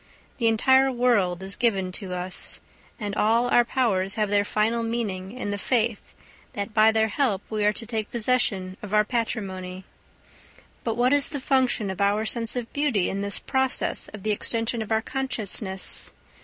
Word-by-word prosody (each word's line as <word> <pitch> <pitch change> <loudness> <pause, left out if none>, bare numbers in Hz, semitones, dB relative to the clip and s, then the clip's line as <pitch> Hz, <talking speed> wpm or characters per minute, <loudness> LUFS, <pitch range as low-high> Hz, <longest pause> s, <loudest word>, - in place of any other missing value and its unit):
The 230 - +3
entire 265 +4 +4
world 210 -8 +1
is 195 +1 -4
given 195 -6 +1
to 185 0 -6
us, 180 +1 -3 0.4
and 205 -3 -3
all 230 +4 +2
our 240 - +5
powers 205 -7 0
have 210 -2 0
their 205 0 +3
final 215 +3 0
meaning 215 -5 -3
in 235 -4 -4
the 205 - -3
faith 230 -2 -1 0.4
that 205 +2 -4
by 220 0 +6
their 220 0 +2
help 215 -7 0
we 215 -1 -1
are 210 - +4
to 230 - -4
take 220 -2 -3
possession 215 -6 0
of 210 0 -3
our 210 - +5
patrimony. 190 -6 -3 1.0
But 225 -1 -2
what 250 +3 +3
is 285 -1 +3
the 290 -3 -4
function 255 -7 +1
of 190 - -5
our 205 +2 +2
sense 230 +1 0
of 245 -2 -4
beauty 280 -11 +1
in 195 - -3
this 200 0 0
process 265 -1 0
of 215 -3 -10
the 215 - +1
extension 225 +2 -1
of 220 - -6
our 220 0 +2
consciousness? 215 -8 -1
220 Hz, 180 wpm, -25 LUFS, 200-240 Hz, 1.0 s, by